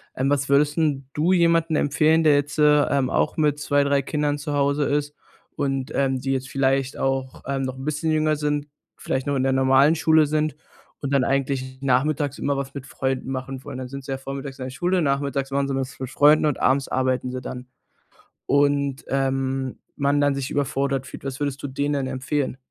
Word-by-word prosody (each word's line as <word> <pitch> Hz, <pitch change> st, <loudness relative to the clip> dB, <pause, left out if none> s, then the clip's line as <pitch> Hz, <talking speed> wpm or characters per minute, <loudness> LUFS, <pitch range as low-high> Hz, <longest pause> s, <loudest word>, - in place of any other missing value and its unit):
Ähm, 135 Hz, +1 st, 0 dB
was 145 Hz, 0 st, +1 dB
würdest 145 Hz, +2 st, +3 dB
denn 145 Hz, -4 st, 0 dB
du 165 Hz, +5 st, +2 dB
jemanden 165 Hz, -2 st, +3 dB
empfehlen, 155 Hz, +2 st, +3 dB
der 150 Hz, -2 st, +5 dB
jetzt, 145 Hz, +1 st, -1 dB
äh, 150 Hz, -1 st, +5 dB
ähm, 135 Hz, -2 st, +1 dB
auch -, -, 0 dB
mit 150 Hz, -2 st, +1 dB
2, 145 Hz, -1 st, +2 dB
3 140 Hz, 0 st, +2 dB
Kindern 145 Hz, +1 st, -1 dB
zu 145 Hz, +1 st, -4 dB
Hause 140 Hz, +1 st, +1 dB
ist 145 Hz, 0 st, -1 dB, 0.4 s
und, 135 Hz, 0 st, -2 dB
ähm 135 Hz, -1 st, +1 dB
die 135 Hz, -, -2 dB
jetzt 130 Hz, 0 st, -2 dB
vielleicht 135 Hz, 0 st, 0 dB
auch, 135 Hz, -1 st, -2 dB
ähm, 135 Hz, 0 st, -2 dB
noch 130 Hz, -1 st, -3 dB
'n 130 Hz, -, -8 dB
bisschen 155 Hz, +1 st, -1 dB
jünger 155 Hz, 0 st, +2 dB
sind, 150 Hz, -1 st, -1 dB, 0.3 s
vielleicht 130 Hz, +1 st, -3 dB
noch 140 Hz, -, 0 dB
in 130 Hz, -, +1 dB
der 135 Hz, -, +2 dB
normalen 135 Hz, +3 st, +4 dB
Schule 160 Hz, -1 st, +4 dB
sind 155 Hz, 0 st, 0 dB, 0.5 s
und 140 Hz, -1 st, -3 dB
dann 135 Hz, -2 st, +3 dB
eigentlich 130 Hz, -1 st, -1 dB
nachmittags 140 Hz, +2 st, +1 dB
immer 140 Hz, 0 st, -1 dB
was 135 Hz, -1 st, -4 dB
mit 140 Hz, -2 st, -7 dB
Freunden 130 Hz, 0 st, -3 dB
machen 130 Hz, 0 st, -5 dB
wollen. -, -, -6 dB
Dann 130 Hz, -1 st, -6 dB
sind 140 Hz, 0 st, -8 dB
sie 135 Hz, -, -6 dB
ja -, -, -3 dB
vormittags 135 Hz, 0 st, -7 dB
in 130 Hz, -, -4 dB
der -, -, -5 dB
Schule, 180 Hz, +6 st, 0 dB
nachmittags 140 Hz, -1 st, -1 dB
machen 140 Hz, 0 st, 0 dB
sie 135 Hz, -, -2 dB
was 135 Hz, 0 st, -4 dB
mit 130 Hz, -, -4 dB
Freunden 145 Hz, +3 st, +5 dB
und 150 Hz, -3 st, 0 dB
abends 135 Hz, +1 st, +2 dB
arbeiten 130 Hz, -1 st, 0 dB
sie 130 Hz, 0 st, -5 dB
dann 125 Hz, 0 st, -7 dB, 0.8 s
und, 140 Hz, -1 st, +1 dB
ähm, 135 Hz, -1 st, -1 dB, 0.2 s
man 140 Hz, +1 st, +1 dB
dann 145 Hz, -1 st, +2 dB
sich 135 Hz, -1 st, -4 dB
überfordert 140 Hz, -2 st, -1 dB
fühlt. -, -, -10 dB
Was 135 Hz, -1 st, -5 dB
würdest 145 Hz, -1 st, -2 dB
du -, -, -2 dB
denen 140 Hz, +2 st, -2 dB
denn 140 Hz, -2 st, -1 dB
empfehlen? 130 Hz, +1 st, -2 dB
140 Hz, 210 wpm, -23 LUFS, 135-145 Hz, 0.8 s, der